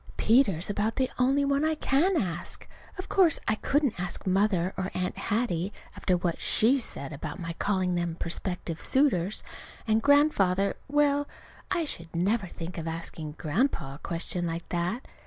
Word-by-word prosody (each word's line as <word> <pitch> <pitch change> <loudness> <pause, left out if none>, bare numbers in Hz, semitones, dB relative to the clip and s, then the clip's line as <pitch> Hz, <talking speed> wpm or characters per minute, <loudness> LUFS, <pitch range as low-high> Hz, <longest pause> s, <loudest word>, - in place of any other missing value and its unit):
Peter's 210 - +3
about 210 +2 -1
the 260 -1 0
only 270 +3 +3
one 280 +1 +1
I 315 0 +2
can 315 +5 +2
ask. 175 -6 -3 0.3
Of 370 - -5
course 360 -5 +4
I - - +3
couldn't 270 - 0
ask 180 +1 -5
Mother, 190 -1 +2
or 190 0 -2
Aunt 180 0 -1
Hattie, 205 -4 -1 0.2
after 180 -2 +1
what 175 -1 -2
she 250 +6 +4
said 145 - -4
about 145 +5 -6
my 170 -1 -4
calling 185 -3 +1
them 175 -1 -1
prospective 170 -1 -3
suitors. 215 -9 +2 0.4
And 220 0 +3
Grandfather 200 -10 +3
well, 290 0 +2 0.4
I 340 -2 +1
should 170 - -6
never 195 +4 +1
think 170 0 -7
of 165 - -5
asking 160 -2 -5
Grandpa 160 - -1
a 140 - -11
question 175 +1 -1
like 165 0 -4
that. 175 +8 -2
195 Hz, 160 wpm, -28 LUFS, 170-270 Hz, 0.4 s, course